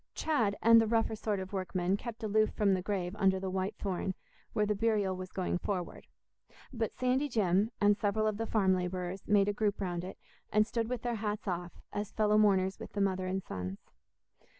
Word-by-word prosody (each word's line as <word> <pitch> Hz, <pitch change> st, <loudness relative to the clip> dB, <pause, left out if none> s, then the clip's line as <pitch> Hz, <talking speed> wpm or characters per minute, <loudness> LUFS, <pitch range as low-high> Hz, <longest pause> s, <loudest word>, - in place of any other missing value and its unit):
Chad 230 Hz, -11 st, +1 dB
and 230 Hz, 0 st, +8 dB
the 225 Hz, -, +1 dB
rougher 225 Hz, 0 st, +1 dB
sort 210 Hz, -2 st, -2 dB
of 190 Hz, +1 st, -7 dB
workmen 185 Hz, -1 st, 0 dB
kept 230 Hz, +2 st, -7 dB
aloof 215 Hz, 0 st, +3 dB
from 200 Hz, -2 st, +3 dB
the 185 Hz, -, 0 dB
grave 185 Hz, -1 st, -2 dB
under 190 Hz, -1 st, +3 dB
the 190 Hz, 0 st, -3 dB
white 190 Hz, +3 st, -2 dB
thorn, 190 Hz, -1 st, -2 dB, 0.4 s
where 210 Hz, -, +1 dB
the 210 Hz, -, +1 dB
burial 205 Hz, -3 st, +1 dB
was 185 Hz, 0 st, -7 dB
going 180 Hz, -1 st, -1 dB
forward; 180 Hz, -3 st, -4 dB, 0.7 s
but 225 Hz, -3 st, -1 dB
Sandy 255 Hz, +3 st, 0 dB
Jim, 205 Hz, -2 st, +2 dB
and 205 Hz, 0 st, +5 dB
several 215 Hz, +1 st, 0 dB
of 215 Hz, -1 st, 0 dB
the 225 Hz, +1 st, -2 dB
farm 195 Hz, -4 st, +3 dB
labourers, 180 Hz, +1 st, -4 dB
made 205 Hz, -1 st, +4 dB
a 205 Hz, -, +1 dB
group 210 Hz, 0 st, 0 dB
round 175 Hz, -3 st, -2 dB
it, 185 Hz, -, -7 dB, 0.3 s
and 215 Hz, 0 st, +4 dB
stood 225 Hz, 0 st, -2 dB
with 250 Hz, -2 st, -3 dB
their 240 Hz, -1 st, -1 dB
hats 210 Hz, -2 st, -3 dB
off, 175 Hz, -1 st, -3 dB, 0.2 s
as 205 Hz, 0 st, -3 dB
fellow 210 Hz, -1 st, +3 dB
mourners 190 Hz, -2 st, +3 dB
with -, -, -9 dB
the 205 Hz, -, -3 dB
mother 190 Hz, -2 st, +1 dB
and 190 Hz, +1 st, -2 dB
sons. 95 Hz, +1 st, -6 dB
200 Hz, 205 wpm, -32 LUFS, 185-215 Hz, 0.7 s, and